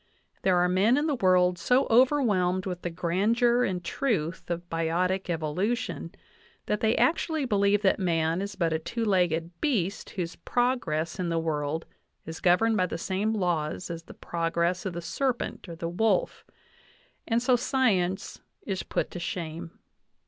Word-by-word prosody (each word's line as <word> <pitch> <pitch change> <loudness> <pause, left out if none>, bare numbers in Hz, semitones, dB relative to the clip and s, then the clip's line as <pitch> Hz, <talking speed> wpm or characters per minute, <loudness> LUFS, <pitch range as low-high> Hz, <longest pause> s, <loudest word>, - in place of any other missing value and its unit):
There 185 -2 +3
are 175 0 +4
men 195 +8 +3
in 295 - +1
the 310 - +1
world 180 -5 +3
so 250 +10 +3
overwhelmed 220 -8 +3
with 180 -2 -4
the 175 - -3
grandeur 215 +9 +2
and 180 -5 -2
truth 185 - -2
of 175 0 -3
biotic 175 +3 -1
evolution 175 +9 -2 0.5
that 210 - -1
they 225 0 +2
actually 315 -3 +1
believe 205 -2 +2
that 190 - +3
man 165 -1 +1
is 200 0 -5
but 170 -4 0
a 160 - 0
two 230 +8 -3
legged 175 -4 +1
beast 205 - -1
whose 175 -3 -4
progress 195 -10 -1
in 180 -2 -1
the 165 - 0
world 160 -1 -2 0.4
is 160 0 -7
governed 215 +5 +3
by 185 -1 +2
the 165 - -4
same 200 +5 -1
laws 175 -3 -1
as 165 -1 -5
the - - -14
progress 170 +2 -1
of 185 - -4
the 170 - -4
serpent 255 -2 -2
or 165 - -6
the 165 0 -4
wolf; 190 +3 0 0.8
and 230 0 +2
so 250 0 +4
science 205 -8 0 0.2
is 190 -2 -3
put - - -2
to 175 - -6
shame. 170 -1 -5
185 Hz, 165 wpm, -27 LUFS, 170-220 Hz, 0.8 s, are